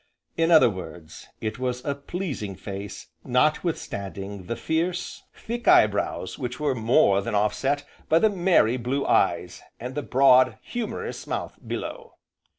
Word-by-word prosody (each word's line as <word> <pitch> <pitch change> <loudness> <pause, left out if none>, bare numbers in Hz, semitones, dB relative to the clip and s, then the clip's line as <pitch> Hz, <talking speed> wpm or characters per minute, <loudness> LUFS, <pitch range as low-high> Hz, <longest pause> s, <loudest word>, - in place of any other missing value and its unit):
In 165 0 +2
other 160 -6 +7
words, 90 -6 -8
it 110 +1 -3
was 125 0 -3
a 140 - 0
pleasing 140 - -5
face 100 +1 -7
notwithstanding 100 - -1
the 115 - -2
fierce, 170 +5 -2
thick 240 +1 -6
eye - - +8
brows 100 0 -3
which 125 0 -4
were 150 -2 +1
more 110 -4 +3
than 100 - -3
offset 135 +8 0 0.2
by 160 - +5
the 220 - +5
merry 175 - +3
blue 130 +3 -2
eyes, - - +1 0.2
and 125 +2 -6
the 145 - -2
broad, 130 -1 +5
humourous 240 -3 -5
mouth - - -4
below. 475 -2 -6
130 Hz, 145 wpm, -25 LUFS, 105-160 Hz, 0.2 s, eye